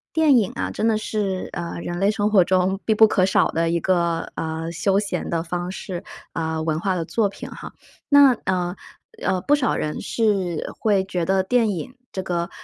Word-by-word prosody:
电 310 -5 +5
影 210 -5 +1
啊， - - -2
真 - - -2
的 220 -1 +2
是， 205 -3 -2
呃， 170 -1 -4
人 175 0 -4
类 200 +2 +3
生 210 -1 0
活 200 -4 +5
中 185 +1 +1
必 220 - +2
不 220 +1 +7
可 185 -3 +2
少 190 - +3
的 165 0 0
一 170 - +1
个， 170 -2 +1
呃， 160 0 -3
休 195 +4 +1
闲 205 - -3
的 165 -1 0
方 175 +2 -4
式。 185 -2 -6 0.3
呃， 160 -1 -2
文 160 -1 0
化 190 +1 0
的 170 -2 -2
作 210 +4 +1
品 - - -9
哈。 - - -9 0.4
那， 285 -2 +7
呃， 180 -1 -1 0.5
呃， 185 - +1
不 290 +9 +3
少 270 -5 0
人 150 - -3
是 195 -7 0
会 205 -3 +2
觉 180 -3 -2
得 190 +2 +2
电 230 +2 +2
影 200 +6 -5 0.2
这 190 - -3
个， 170 -1 -2
190 Hz, 220 characters per minute, -22 LUFS, 170-210 Hz, 0.5 s, 不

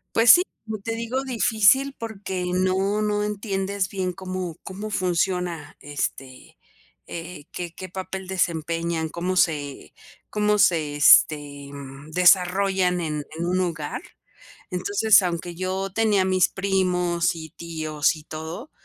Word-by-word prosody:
Pues 230 0 +8
sí, 355 - +8 0.2
como 215 -2 -5
te 225 +2 -3
digo, 235 +4 -2
difícil 250 +2 +3
porque 200 -5 -5
no 190 +3 +1
no 210 0 0
entiendes 200 -2 -2
bien 190 -2 -2
cómo 185 -2 -5
cómo 205 +3 -7
funciona, 180 -4 -1
este, 135 -2 -5 0.5
eh, 165 -3 -8
qué 175 -2 -5
qué 185 - -8
papel 190 +1 -6
desempeñan, 165 -2 -1
cómo 180 +3 -3
se 145 -5 0 0.4
cómo 210 0 +1
se, 155 -6 +2
este, 145 -1 +4
mm, 140 +2 -10
desarrollan 180 +1 +3
en 150 -3 -3
en 170 - -2
un 185 +1 +1
hogar. 165 -4 -3 0.7
Entonces, 200 +3 +4
aunque 170 -1 -3
yo 190 +1 -2
tenía 210 -3 +2
mis 185 -1 +3
primos, 180 -3 0
y 160 -2 -8
tíos, 155 -2 -1
y 155 - -11
todo, 160 - -7
180 Hz, 130 wpm, -24 LUFS, 165-200 Hz, 0.7 s, Pues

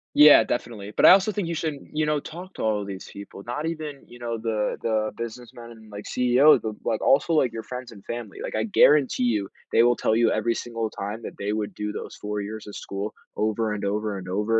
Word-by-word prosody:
Yeah, 150 0 +9
definitely, 110 -4 -4
but - - +5
I - - +11
also 195 +3 +5
think 200 -3 -2
you 170 - -2
should, 155 -1 -2 0.2
you 155 0 +1
know, 150 -1 +1
talk 175 +6 -9
to - - -5
all 110 -1 +1
of 100 - -6
these 95 -1 -7
people, 100 0 -10
not 125 +6 -3
even, 155 -4 -5
you 120 - -14
know, 120 -1 -3
the 110 -2 -1
the 110 -1 0
businessmen, 120 +1 -8
and, 110 -2 -15
like, 105 0 -8
CEOs, 125 +4 +5
but, 110 -1 -3
like, 110 - -1
also, 140 +5 +3
like, 135 -6 +2
your 115 - -5
friends 125 -2 -7
and 100 -2 -14
family. 115 -4 -6
Like, - - -5
I 110 - 0
guarantee 135 +3 +4
you, 110 -5 +1 0.2
they 115 - +5
will 120 0 +4
tell 110 - +1
you 115 0 +4
every 115 +2 +1
single 115 -1 -3
time, 105 +2 -5
that - - -8
they 100 +1 -1
would 105 -1 -3
do 105 0 -3
those - - -7
4 105 0 -4
years 105 +2 -7
of 105 - -8
school 100 +2 -5 0.2
over 110 +1 0
and 100 -1 -4
over 105 0 -1
and 95 -1 -8
over 105 +4 +1
115 Hz, 245 wpm, -25 LUFS, 105-125 Hz, 0.2 s, I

